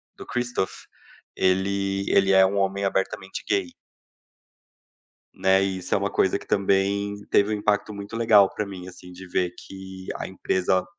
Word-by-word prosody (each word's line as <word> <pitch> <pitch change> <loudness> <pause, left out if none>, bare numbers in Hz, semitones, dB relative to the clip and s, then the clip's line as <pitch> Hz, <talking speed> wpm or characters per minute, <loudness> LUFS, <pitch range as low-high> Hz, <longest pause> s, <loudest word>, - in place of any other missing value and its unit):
do - - -10
Christoph, 125 -5 -3 0.5
ele 100 +1 0
ele 95 0 +4
é 95 0 +7
um 100 +1 -1
homem 100 0 0
abertamente 95 0 -2
gay. 95 -4 0 1.6
Né? 95 0 +3
E 95 -1 -1
isso 90 - -1
é - - +4
uma 100 0 -2
coisa 95 - +2
que - - -13
também 100 +1 0
teve 100 +1 +4
um 105 - 0
impacto 105 0 0
muito 100 +2 -8
legal 110 -4 +5
pra 105 - -2
mim, 95 -2 -8
assim, 90 0 -12
de 90 +1 -11
ver 90 0 -1
que 95 -1 -10
a - - -5
empresa, 95 0 0
95 Hz, 165 wpm, -24 LUFS, 95-100 Hz, 1.6 s, é